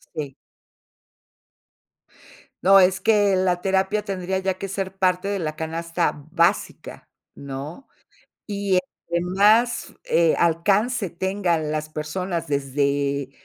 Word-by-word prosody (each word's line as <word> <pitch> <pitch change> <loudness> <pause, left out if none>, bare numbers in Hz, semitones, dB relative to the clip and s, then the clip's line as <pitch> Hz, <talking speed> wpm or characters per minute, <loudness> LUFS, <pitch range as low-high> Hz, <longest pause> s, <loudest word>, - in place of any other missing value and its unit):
Sí. 145 -4 -5 2.3
No, 195 +1 +7
es 185 0 +3
que 205 -3 +3
la 185 -1 +1
terapia 195 +2 0
tendría 190 -2 -2
ya 190 0 -1
que 195 - -6
ser 195 0 -4
parte 185 0 +1
de 200 -1 -1
la 155 -3 -3
canasta 165 +2 -2 0.2
básica, 175 +3 -1 0.3
¿no? 140 - -8 0.6
Y 200 -3 +1 0.3
entre 170 0 0
más, 210 +7 +2
eh, 165 -1 +3
alcance 195 +5 +1
tengan 175 -4 -1
las 155 0 -3
personas 170 +3 -4
desde 140 0 -1
180 Hz, 110 wpm, -23 LUFS, 155-195 Hz, 2.3 s, No